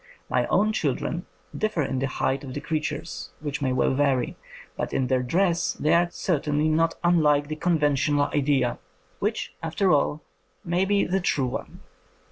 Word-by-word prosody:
My - - +2
own 215 +2 +2
children 165 +1 -2 0.3
differ 215 -8 0
in 130 -1 -2
the 135 - 0
height 135 +1 -1
of 130 -2 -7
the - - -2
creatures, 155 +1 -4
which 145 -1 -4
may 130 -2 +1
well 130 +1 +2
vary, 135 -2 +1 0.4
but - - -3
in 130 - +1
their 130 0 +1
dress 170 +6 +1
they 150 - +1
are 170 0 +4
certainly 150 -3 0
not 165 +1 +2
unlike 150 -4 +3
the 155 - -2
conventional 145 -3 +2
idea, 135 -4 +1 0.4
which, - - -2
after 165 +4 +1
all, 150 0 +1 0.4
may 175 +1 0
also 190 - +2
be 205 -1 +3
the 190 +2 0
true 145 -6 +1
one. 125 - -6
150 Hz, 170 wpm, -25 LUFS, 140-170 Hz, 0.4 s, are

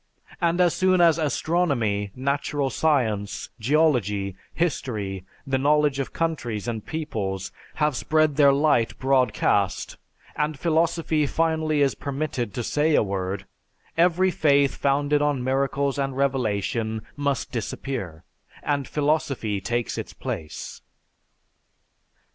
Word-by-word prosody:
And 170 0 +2
as 175 -2 +4
soon 185 -1 +3
as 170 -2 +5
astronomy, 140 - 0
natural 140 +1 -1
science, 110 -10 0
geology, 110 - +1 0.2
history, 105 - -2 0.2
the 135 -1 0
knowledge 145 0 +3
of 135 - -3
countries 120 -11 -2
and 110 -3 -3
peoples, 105 - -4 0.2
have 150 -3 +1
spread 155 +2 +2
their 140 -1 +6
light 140 -5 +2
broadcast, 125 -7 +1 0.4
and 150 0 -1
philosophy 160 -1 +1
finally 160 -1 +1
is 135 - +2
permitted 135 -5 -3
to 120 - -2
say 150 +5 +2
a - - +4
word, 95 -1 -3 0.5
every 180 +2 +3
faith 140 -4 +3
founded 145 +1 +1
on 145 -4 +1
miracles 135 +1 0
and 135 -1 -2
revelation 110 -4 -1
must 140 -1 -1
disappear; 110 - -4 0.4
and 140 -2 -1
philosophy 140 -9 0
takes 120 +2 -2
its - - -7
place." 80 -2 -6
140 Hz, 115 wpm, -24 LUFS, 115-155 Hz, 0.5 s, their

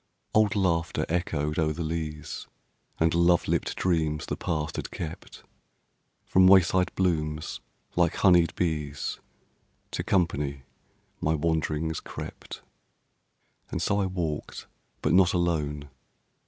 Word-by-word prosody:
Old 110 -2 +4
laughter 85 -4 +1
echoed 80 -2 -1
o'er 75 -1 +1
the 85 - -4
leas 80 -2 -4 0.5
And 80 0 +3
love 85 0 +3
lipped - - 0
dreams 80 -4 0
the - - -3
past 75 -3 -3
had - - -4
kept, 80 -2 -7 0.8
From 95 0 +5
wayside 95 -1 +5
blooms 75 -4 -1 0.3
like 85 -2 +2
honeyed 90 -4 +4
bees 75 -5 -2 0.7
To - - -2
company 75 -7 0 0.6
my 80 +1 +1
wanderings 80 0 -1
crept. - - -8 1.1
And - - -3
so 100 -1 +1
I 95 - +1
walked, 85 -5 -4 0.4
but 75 - +2
not 95 -1 +5
alone. 75 -5 -1
80 Hz, 115 wpm, -27 LUFS, 75-90 Hz, 1.1 s, From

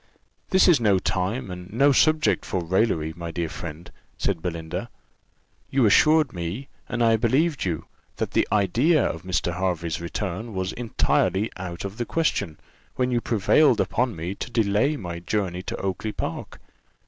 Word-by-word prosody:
"This 190 - +5
is 170 -7 +6
no 105 -4 +3
time, 95 +4 -2
and 90 0 -8
no 140 +6 +4
subject 155 +3 +3
for 90 - -2
raillery, 85 -3 +1
my 85 -1 -6
dear 85 0 -3
friend," 85 +1 -8 0.3
said 90 -5 -1
Belinda; 80 -2 -4 0.8
"you 130 -3 +3
assured 155 +6 +5
me, 90 - -5 0.2
and 120 -1 0
I 115 -1 +4
believed 135 - +1
you, 85 -5 -2 0.3
that - - -3
the - - +2
idea 115 - +3
of 80 - -3
Mr. 90 -1 -1
Hervey's 85 -4 -1
return 100 +5 -4
was 95 +1 -2
entirely 110 -3 0
out 90 -1 -6
of 100 +2 -6
the 120 - -2
question, 100 - -1 0.4
when 125 0 0
you 120 -1 +1
prevailed 120 +5 +3
upon 125 -2 0
me 85 +3 -4
to - - -6
delay 115 +6 +1
my 85 -6 -6
journey 90 -1 -2
to - - -5
Oakly 95 +3 -3
park. - - -5
100 Hz, 160 wpm, -24 LUFS, 90-125 Hz, 0.8 s, is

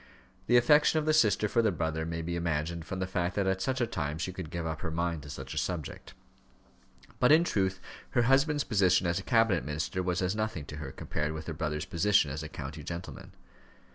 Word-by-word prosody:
The 120 - +6
affection 150 +6 +5
of 155 - +1
the 155 - +3
sister 110 -7 +3
for 115 - +2
the 110 -2 +2
brother 80 -1 -2
may 85 0 -3
be 85 +1 -3
imagined 85 0 -2
from 95 - -5
the 95 - -1
fact 90 -1 -2
that 100 - +1
at 95 0 0
such 130 +6 -1
a 120 - +2
time 75 -9 -3
she 90 +3 -3
could 90 -3 -6
give 85 0 -4
up 80 -1 -4
her 80 - -3
mind 85 0 -2
to 75 - -11
such 70 - -7
a - - -1
subject. 85 -5 -5 1.0
But, 125 - +5
in 160 +2 +7
truth, 95 - 0 0.4
her 120 - +5
husband's 140 +4 +3
position 95 -5 +3
as 85 +2 +1
a - - -5
cabinet 115 -5 +2
minister 75 +5 -2
was 90 +1 -1
as 90 +3 0
nothing 110 -8 -2
to 75 - -8
her 75 -3 -6
compared 75 +3 -3
with 80 0 -6
her 80 - -4
brother's 75 -1 -3
position 95 -4 +2
as 75 +3 -4
a 75 - -6
county 75 +1 -7
gentleman. 85 +4 -7
90 Hz, 230 wpm, -30 LUFS, 80-105 Hz, 1.0 s, in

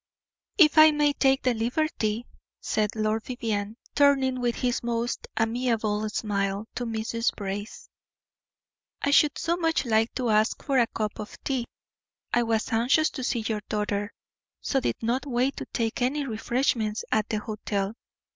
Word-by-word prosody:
"If 315 -4 +6
I 310 0 +10
may 295 -1 +2
take 270 -1 +2
the 255 - +3
liberty," 235 -2 -1 0.3
said 215 0 -1
Lord 215 0 0
Vivianne, 220 -4 -3 0.2
turning 270 -3 +3
with 240 -1 0
his 245 -1 -1
most 235 0 -2
amiable 225 -2 0
smile 200 -1 -1
to 245 - -3
Mrs. 230 +1 -1
Brace, 205 +1 -6 1.2
"I 285 - +2
should 290 0 +4
so 335 +1 0
much 325 -4 +1
like 225 -1 +2
to 245 -3 0
ask 215 +1 +2
for 270 -2 +2
a 235 - +4
cup 215 -2 -4
of 210 - -7
tea. 260 -4 -1 0.7
I 240 - +4
was 225 -1 0
anxious 250 +8 +3
to 260 - -6
see 240 -1 0
your 215 -2 -1
daughter, 205 0 -1 0.5
so 270 - 0
did - - -1
not 250 +5 0
wait 260 +2 0
to - - -6
take 230 0 -2
any 280 +4 0
refreshments 225 -2 -1
at 215 0 +1
the 215 - 0
hotel. 210 -2 -3
230 Hz, 155 wpm, -26 LUFS, 215-265 Hz, 1.2 s, I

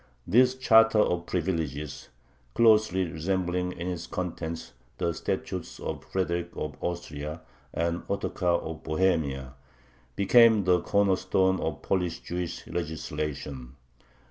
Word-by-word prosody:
This 125 +7 +4
charter 115 -3 +5
of 90 -4 +2
privileges, 80 -5 -3 0.5
closely 110 -5 +4
resembling 90 +2 -1
in 85 -1 -6
its 90 -2 -4
contents 85 -2 -5 0.2
the 85 - 0
statutes - - -4
of - - -5
Frederick 85 -2 -1
of 75 -1 -4
Austria 75 -2 -4 0.3
and 85 +1 -1
Ottocar 90 -3 0
of 80 -1 -6
Bohemia, 80 -6 0 0.6
became 110 +1 +6
the 90 -1 +3
corner 100 -2 +2
stone 95 0 +2
of 75 -4 -3
Polish 90 -3 0
Jewish 85 -1 -4
legislation. 75 -5 -4
85 Hz, 115 wpm, -28 LUFS, 80-95 Hz, 0.6 s, became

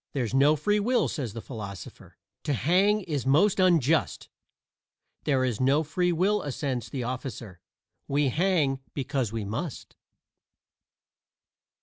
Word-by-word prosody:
"There's 125 -5 -2
no 140 +3 +5
free 210 +7 +1
will," 245 +4 +2
says 125 -9 -4
the 115 - -7
philosopher; 100 - -9 0.3
"To 145 - 0
hang 190 - +2
is 145 - -3
most 175 +9 +3
unjust." 165 -5 +2 1.0
"There 135 -3 +2
is 125 -4 -1
no 140 +4 +3
free 175 +4 0
will," 195 +5 +1
assents 130 - -3
the 130 +1 -4
officer; 120 -7 -6 0.5
"We 140 0 +1
hang 155 -3 +1 0.2
because 135 -5 -2
we 110 -2 -4
must." 115 - -5
140 Hz, 125 wpm, -27 LUFS, 125-175 Hz, 1.0 s, no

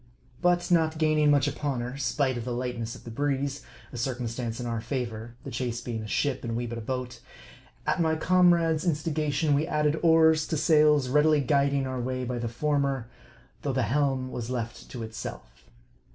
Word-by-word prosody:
But 175 0 +2
not 160 -2 +3
gaining 155 -1 +3
much 145 -1 +4
upon 140 -3 -2
her, 125 +2 -5
spite 135 0 0
of 120 - -4
the 125 +1 -3
lightness 120 -2 -3
of - - -13
the 115 - -8
breeze 140 +2 -1 0.3
(a - - -6
circumstance 120 -1 -3
in 125 - -4
our 115 -2 -2
favor: 120 -3 -4
the - - -7
chase 120 0 -2
being 115 -2 -4
a 110 - -6
ship, 135 +4 -1
and 115 -1 -3
we 120 +1 -2
but 115 0 -5
a - - -6
boat), 125 0 -4 0.7
at - - +1
my 160 -1 +2
comrade's 170 -2 +3
instigation, 155 -2 0
we 150 +3 +1
added 150 -1 +1
oars 160 -1 +5
to 160 - -1
sails, 150 -3 +4
readily 150 +3 +4
guiding 140 0 +2
our 130 -1 -3
way 130 +1 -2
by 125 0 -3
the 120 - -2
former, 135 -1 -1 0.5
though 140 - -2
the 130 -1 +1
helm 130 +2 0
was 120 -1 -5
left 120 -2 -5
to 120 -3 -6
itself. 110 - -8
135 Hz, 190 wpm, -27 LUFS, 120-150 Hz, 0.7 s, oars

